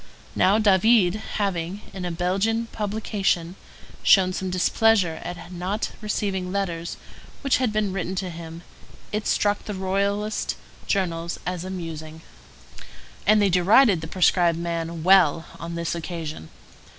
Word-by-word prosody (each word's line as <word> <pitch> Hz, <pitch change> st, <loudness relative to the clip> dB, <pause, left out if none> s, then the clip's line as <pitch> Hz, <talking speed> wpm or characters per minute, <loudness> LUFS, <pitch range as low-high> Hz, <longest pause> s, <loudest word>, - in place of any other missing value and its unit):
Now 195 Hz, +3 st, +4 dB
David, 205 Hz, -2 st, +4 dB, 0.2 s
having, 195 Hz, -1 st, -2 dB
in 185 Hz, -2 st, -5 dB
a 175 Hz, -, -2 dB
Belgian 195 Hz, +7 st, 0 dB
publication, 200 Hz, -4 st, -1 dB, 0.5 s
shown 185 Hz, -2 st, +5 dB
some 190 Hz, 0 st, -3 dB
displeasure 185 Hz, -1 st, +2 dB
at 175 Hz, 0 st, -7 dB
not 185 Hz, +4 st, -3 dB
receiving 195 Hz, -3 st, -2 dB
letters 175 Hz, -4 st, -3 dB, 0.4 s
which 275 Hz, -2 st, +2 dB
had 255 Hz, -4 st, 0 dB
been 210 Hz, -2 st, 0 dB
written 190 Hz, 0 st, -3 dB
to 185 Hz, -1 st, -3 dB
him, 165 Hz, 0 st, -9 dB, 0.5 s
it 210 Hz, 0 st, -2 dB
struck 205 Hz, 0 st, +1 dB
the 210 Hz, -, -4 dB
royalist 200 Hz, +3 st, -1 dB, 0.3 s
journals 170 Hz, -3 st, -1 dB
as 180 Hz, -1 st, -3 dB
amusing; 160 Hz, -4 st, -7 dB, 1.1 s
and 215 Hz, +1 st, +6 dB
they 200 Hz, -1 st, +3 dB
derided 185 Hz, +2 st, +5 dB
the 160 Hz, -, -5 dB
prescribed 175 Hz, -1 st, +3 dB
man 170 Hz, -1 st, -3 dB
well 175 Hz, -4 st, +5 dB
on 170 Hz, 0 st, -6 dB
this 170 Hz, -1 st, -2 dB
occasion. 160 Hz, -, -6 dB
185 Hz, 130 wpm, -24 LUFS, 170-205 Hz, 1.1 s, and